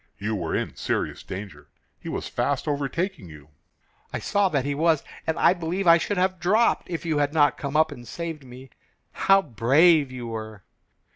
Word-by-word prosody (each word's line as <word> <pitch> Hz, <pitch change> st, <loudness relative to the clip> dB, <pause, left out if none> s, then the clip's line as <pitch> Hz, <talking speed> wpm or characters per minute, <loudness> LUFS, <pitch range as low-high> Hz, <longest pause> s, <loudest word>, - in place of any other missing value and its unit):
"You 105 Hz, +2 st, -3 dB
were 85 Hz, -5 st, -3 dB
in -, -, -3 dB
serious -, -, -2 dB
danger. 90 Hz, -7 st, -8 dB, 0.3 s
He -, -, -8 dB
was -, -, -4 dB
fast 130 Hz, +4 st, -1 dB
overtaking 145 Hz, -, -2 dB
you." 75 Hz, -1 st, -14 dB, 0.6 s
"I -, -, -3 dB
saw 200 Hz, -1 st, +1 dB
that 140 Hz, -5 st, -1 dB
he 145 Hz, -, -1 dB
was, 160 Hz, 0 st, +2 dB, 0.2 s
and 160 Hz, -, 0 dB
I -, -, +5 dB
believe 180 Hz, +2 st, -3 dB
I 170 Hz, 0 st, +7 dB
should 205 Hz, +4 st, -2 dB
have 185 Hz, 0 st, +1 dB
dropped 210 Hz, +7 st, +2 dB
if 170 Hz, -1 st, -4 dB
you 155 Hz, -3 st, 0 dB
had 145 Hz, +1 st, 0 dB
not 145 Hz, -3 st, +4 dB
come 140 Hz, 0 st, -3 dB
up 160 Hz, 0 st, +3 dB
and 120 Hz, -4 st, -10 dB
saved 165 Hz, -4 st, -6 dB
me. 130 Hz, 0 st, -13 dB, 0.4 s
How 195 Hz, 0 st, +3 dB
brave 140 Hz, -, +4 dB
you 125 Hz, -2 st, -7 dB
were!" 110 Hz, -3 st, -7 dB
145 Hz, 190 wpm, -25 LUFS, 120-170 Hz, 0.6 s, I